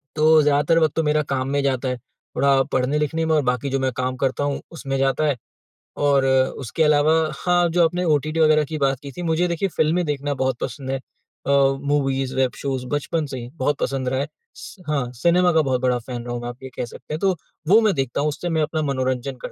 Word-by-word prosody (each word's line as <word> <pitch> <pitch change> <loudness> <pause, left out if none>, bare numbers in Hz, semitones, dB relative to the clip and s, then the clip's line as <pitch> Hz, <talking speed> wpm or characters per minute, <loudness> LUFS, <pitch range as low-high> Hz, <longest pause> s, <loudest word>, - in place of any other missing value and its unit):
तो 155 0 +5
ज़्यादातर 150 +2 +3
वक़्त 155 -3 +2
तो 160 - +1
मेरा 150 0 +2
काम 130 -1 -1
में 140 +1 +1
जाता 130 -1 0
है। 125 - -2
थोड़ा 135 +3 0
पढ़ने-लिखने 150 +5 0
में 160 0 +2
और 150 - +3
बाकी 125 +2 -1
जो 135 0 0
मैं 130 0 0
काम 130 0 -1
करता 135 +1 0
हूँ, 145 -1 -2
उसमें 135 -5 -4
जाता 135 +3 +1
है 145 - +1 0.7
और 140 -2 +3 0.4
उसके 145 +6 0
अलावा 150 0 +4 0.3
हाँ, 175 -1 +3
जो 170 +1 +3
आपने 175 +2 -1
ओटीटी 155 0 +1
वगैरह 155 -1 +5
की 155 +2 -5
बात 135 -3 +1
की 140 - -7
थी, 180 - -8
मुझे 165 +2 +1
देखिए 175 +3 -1
फ़िल्में 165 +3 +2
देखना 145 -1 -2
बहुत 130 -2 -1
पसंद 130 +2 -4
है। 135 - 0
अ, 135 - -14 0.3
मूवीज़, 135 -2 0
वेब 130 -1 +2
शोज़ 135 -2 -3
बचपन 150 +3 -1
से 130 -2 -6
ही 120 0 -8
बहुत 145 -1 0
पसंद 130 -2 -1
रहा 130 - -1
है, 140 - -1 0.3
स - - -10
हाँ, 135 -5 -1
सिनेमा 175 +6 +3
का 160 - +4
बहुत 130 -3 0
बड़ा 125 -1 +2
फ़ैन 120 0 -6
रहा 120 - -5
हूँ 120 - -4
मैं, 120 - -4
आप 120 +2 -11
ये 130 - -6
कह - - -2
सकते 120 - -10
हैं। 155 - -2
तो 190 0 +2 0.3
वो 205 +6 +7
मैं 215 -2 +3
देखता 135 -2 -1
हूँ, 150 - +1
उससे 155 +4 -4
मैं 160 -1 +1
अपना 155 +1 -1
मनोरंजन 130 0 -2
करता - - -4
140 Hz, 235 wpm, -22 LUFS, 130-155 Hz, 0.7 s, वो